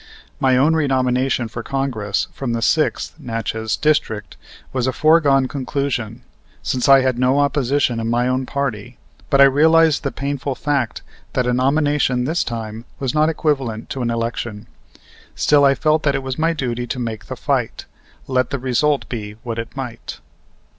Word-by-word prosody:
My 130 -1 +3
own 150 +5 +4
renomination 130 -4 +1
for 115 +1 -6
Congress 120 -6 -2
from 130 -4 -3
the 115 -1 -1
Sixth - - 0
(Natchez) 115 -1 -3
District 110 - 0 0.4
was 130 -1 0
a - - +2
foregone 145 -3 +4
conclusion, 130 -4 -3 0.4
since 130 +1 0
I 135 -1 +8
had 130 -2 0
no 130 +2 +3
opposition 140 -3 +1
in 115 0 -2
my 120 +1 +1
own 130 0 -1
party; 125 -4 -3 0.3
but 140 - +3
I - - +10
realized 155 +3 +5
the 140 - -2
painful 140 -1 -3
fact 140 -6 -1 0.3
that 125 - +1
a 125 - +1
nomination 135 -1 +1
this 160 +6 0
time 115 -1 -6
was 135 -1 -2
not 155 +1 +3
equivalent 135 -8 -2
to 135 - -3
an 120 - 0
election. 115 -2 -3 0.7
Still, 145 -1 +4
I 140 0 +5
felt 155 +1 +2
that 140 -3 +1
it 135 - -2
was 130 +1 -4
my 165 +1 +2
duty 125 -5 -3
to 125 - -4
make 115 -3 -5
the - - -5
fight, - - -2 0.4
let 130 -2 0
the 140 - -2
result 135 +3 0
be 105 -4 -5
what 115 -1 -4
it 115 +3 -7
might. 125 -3 -6
130 Hz, 170 wpm, -20 LUFS, 120-140 Hz, 0.7 s, I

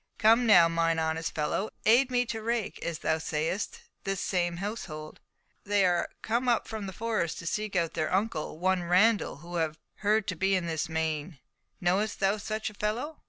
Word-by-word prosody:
Come 230 +2 +5
now, 175 -6 +8
mine 165 0 +1
honest 160 0 -1
fellow, 155 +7 -1 0.2
aid 250 +4 +5
me 245 -1 +2
to 225 -1 -4
rake, 230 -1 -2
as 170 -2 -2
thou 160 0 0
sayest, 160 +5 -2 0.2
this 195 -1 -2
same 175 -3 0
household. 170 -7 -6 0.4
They 205 -1 +2
are 175 -1 +1
come 240 +3 0
up 235 - +2
from 215 -3 -5
the - - -5
Forest, 215 -4 -2
to - - -8
seek 210 +3 -2
out 170 -2 +1
their 155 - -1
uncle, 185 -6 -1
one 185 +1 +1
Randall, 190 +6 +3
who 175 - -9
they - - +2
have 155 -1 -2 0.2
heard 210 0 +2
to 185 - -2
be 190 +3 +2
in 180 -2 0
this 160 -1 -2
meiné. 160 0 -2 0.4
Knowest 190 +4 0
thou 195 +1 +2
such 215 +1 -3
a - - -16
fellow?" 230 +10 -3
190 Hz, 195 wpm, -29 LUFS, 165-215 Hz, 0.4 s, now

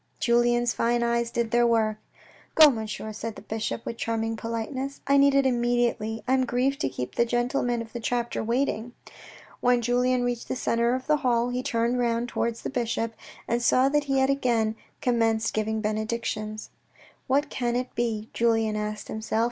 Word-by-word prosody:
Julien's 240 0 +2
fine 235 +1 +1
eyes 235 0 +1
did 235 -1 -2
their 240 0 +4
work. 220 -2 +2 0.3
" - - -27
Go, 310 -2 +9
Monsieur," 220 -3 -5
answered 215 +1 -5
the - - -11
bishop, 220 +1 -4
with 230 - -5
charming 225 -1 -1
polite 230 +3 -4
ness. 270 +1 -4
" - - -41
I 280 - +3
need 280 0 +5
it 275 -1 +4
immediately. 240 -3 0
I 260 - +2
am 260 -1 +2
grieved 260 +3 0
to - - +1
keep 125 -1 -5
the - - +3
gentlemen 240 0 0
of 225 - -15
the 240 - -4
chapter 240 0 -2
waiting." 235 -1 -1 0.7
When 245 0 +3
Julien 250 +1 +2
reached 245 -1 -2
the - - -2
centre 235 0 +1
of 260 0 -5
the 300 0 +3
hall, 245 -3 +1
he 250 +1 -2
turned 240 -2 0
round 235 0 0
towards 235 -1 -2
the - - -3
bishop, 235 -3 -1 0.3
and 235 +1 0
saw 255 +3 +4
that 295 0 +1
he 275 -1 0
had 265 +1 +3
again 235 -5 +1 0.3
com 245 -1 +2
menced 225 -1 +1
giving 220 0 -1
benedictions. 215 0 -3 0.3
" - - -27
What 285 +3 +1
can 240 -1 -1
it 250 +1 -2
be? 225 -2 -2
" - - -40
Julien 225 -2 +1
asked 210 0 -4
himself. 220 0 -2
235 Hz, 200 wpm, -26 LUFS, 225-250 Hz, 0.7 s, Go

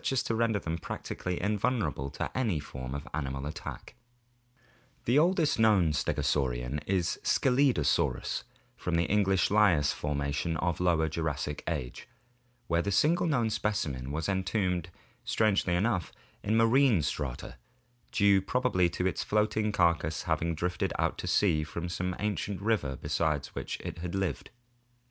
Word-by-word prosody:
as 135 - +1
to - - -2
render 115 -1 +1
them 85 -3 -3
practically 90 +3 -4
invulnerable 105 - 0
to - - -5
any 110 -11 0
form 65 -2 -7
of 70 +2 -6
animal 70 -2 -3
attack. 75 - -7 1.1
The 125 +5 +4
oldest 165 - +2
known 105 -7 +4
stegosaurian 65 -2 0
is 95 -4 0
Scelidosaurus 130 - +2 0.3
from 90 - -2
the 85 - +3
English 95 +1 +2
Lias 95 - +4
(Lower 80 +3 0
Jurassic) 75 -2 -3
formation, 75 -7 -4 0.6
where 85 -5 +1
the 100 - -2
single 170 - +3
known 120 -8 +1
specimen 75 -14 -2
was 80 +2 -2
entombed, 95 -2 0 0.3
strangely 100 -5 +2
enough, 95 0 0 0.3
in 110 +2 +1
marine 115 - +4
strata, 70 -5 -4 0.5
due 100 -2 +4
probably 95 -5 +1
to 90 - -3
its 95 - 0
floating 105 0 +1
carcass 85 -5 +1
having 85 0 0
drifted 90 +2 -1
out - - 0
to - - -4
sea 80 -7 +3
from 85 +2 -5
some 90 +1 -2
ancient 105 -1 -2
river 100 -10 0
beside 75 +1 -1
which - - -4
it 85 - -6
lived. 95 -2 -2
90 Hz, 135 wpm, -30 LUFS, 75-105 Hz, 1.1 s, The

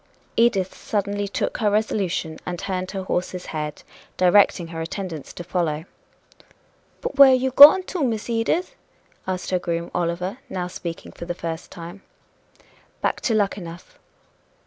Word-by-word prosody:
Edith 200 -6 +2
suddenly 205 -1 -2
took 200 - -2
her 215 -3 +2
resolution, 195 -6 -1
and 180 -1 -4
turned 185 0 -3
her 195 -2 -4
horse's 180 0 -3
head, 150 -1 -4 0.3
directing 180 -2 +4
her 165 -1 -5
attendants 165 -3 -5
to 175 - -7
follow. 165 -3 -2 1.2
"But 280 - -4
where 275 -1 +10
are 260 - +6
you 260 +1 0
going 290 +8 +10
to 365 0 -5
go, 285 - +2
Miss 225 -4 -2
Edith?" 235 +10 0 0.5
asked 185 0 -3
her 185 - +2
groom, 170 -1 -3
Oliver, 180 +6 -2
now 180 -2 -3
speaking 175 -2 -7
for 170 - -9
the 175 0 -4
first 165 -1 -5
time. 175 +3 -10 1.0
"Back - - 0
to 225 - +1
Luckenough." 190 -5 -3
185 Hz, 150 wpm, -23 LUFS, 170-215 Hz, 1.2 s, where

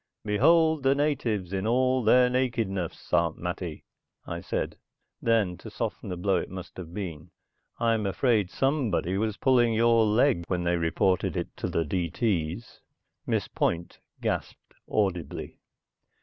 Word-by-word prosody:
"Behold 160 +9 +4
the 135 +1 +3
natives 120 - -1
in 95 +2 -1
all 130 +2 +2
their 125 +3 +6
nakedness, 115 -8 -2
Aunt 85 0 +2
Mattie," 90 -2 -5 0.4
I - - -4
said. - - -3 0.5
Then, 110 -6 +2
to - - -10
soften - - -4
the 90 - -4
blow 95 +1 +1
it - - -3
must 95 -1 -8
have 85 -3 -8
been, 85 -4 -6 0.5
"I'm 115 -3 +1
afraid 105 -1 +2
somebody 125 - 0
was 110 -1 -1
pulling 120 -4 +3
your 115 0 +4
leg 110 -3 +3
when 90 -1 -1
they 85 0 +1
reported 90 +3 +1
it - - -4
to - - -2
the 85 - 0
D.T.'s." 90 +3 -2 0.5
Miss - - 0
Point 85 0 -2 0.2
gasped - - -3 0.2
audibly. 90 -6 -2
105 Hz, 140 wpm, -27 LUFS, 90-120 Hz, 0.5 s, their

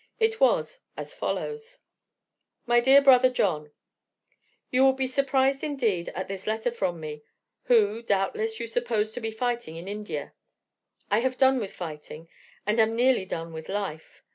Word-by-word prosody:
It 445 0 +1
was - - +2 0.2
as - - -6
follows: 455 +2 -4 0.9
"MY 240 0 +4
DEAR 265 +3 +6
BROTHER 255 -2 +7
JOHN: 155 -11 -1 1.0
"You 255 +1 +4
will 265 0 +6
be 265 0 -1
surprised 270 +1 +1
indeed 230 - -1
at 185 - -4
this 195 0 -7
letter 220 +2 0
from 185 -7 -2
me, 150 -1 -7 0.4
who, 225 -2 +3
doubtless, 220 +1 -1
you 235 - -3
suppose 230 -2 -1
to 245 - -7
be 225 - -2
fighting 235 -6 -3
in 170 +3 -8
India. 200 -8 -5 0.8
I 205 - +4
have 255 +1 -1
done 265 -1 +4
with 205 -4 -4
fighting, 160 -1 -8 0.4
and 210 +3 +1
am 225 0 +3
nearly 245 -4 +3
done 165 -2 -5
with 160 0 -8
life. 190 -6 -5
225 Hz, 160 wpm, -26 LUFS, 190-260 Hz, 1.0 s, BROTHER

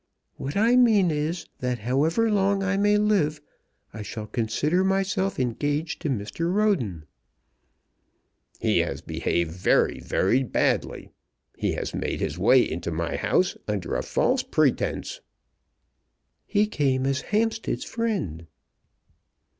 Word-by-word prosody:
"What 140 +7 -4
I 230 +4 +4
mean 215 -8 +5
is, 155 +3 -2
that 125 -1 -1
however 150 - +1
long 195 -1 +2
I 195 0 0
may 205 +1 +3
live 195 -8 +1 0.5
I 110 - -7
shall 105 +1 -6
consider 135 - 0
myself 195 -1 0
engaged 145 +5 -1
to 155 - -2
Mr. 130 +8 -2
Roden." 160 - 0 1.5
"He - - +2
has - - -2
behaved 85 -2 -1
very, 90 +2 +2
very 120 +8 +1
badly. 130 - -1 0.4
He - - -1
has - - -4
made - - -3
his 80 - -3
way 120 +6 +5
into 85 +1 -4
my 85 0 -2
house 185 - +1
under 100 -5 -2
a - - 0
false - - +1
pretence." - - 0 1.3
"He 210 +1 +2
came 135 -9 0
as 135 0 0
Hampstead's 225 +1 -1
friend." 190 - -3
150 Hz, 125 wpm, -25 LUFS, -, 1.5 s, mean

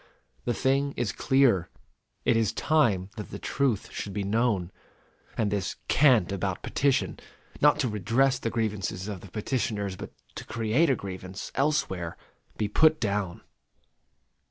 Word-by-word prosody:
The 120 - 0
thing 140 +1 +1
is 115 -5 0
clear. 130 -10 +3 0.6
It 120 - +4
is 115 -3 +2
time 110 -12 +2
that 105 - -6
the - - -6
truth 130 -7 -1
should 100 - -5
be 100 0 -2
known, 100 -3 +1 0.7
and 105 -3 +1
this 100 -3 -1
cant 125 - +5
about 95 -1 -2
petition, 135 -1 +1 0.4
not 150 0 +6
to 130 - +1
redress 120 +5 +2
the 115 - -2
grievances 105 -4 -2
of 100 -4 -5
the 100 - -11
petitioners, 105 -2 -2
but - - -8 0.2
to - - -7
create 115 +8 +1
a 135 - +4
grievance 95 -2 -7
elsewhere, 135 - 0 0.4
be 105 - 0
put 155 +9 +4
down.... 100 -5 -1
110 Hz, 145 wpm, -27 LUFS, 100-135 Hz, 0.7 s, not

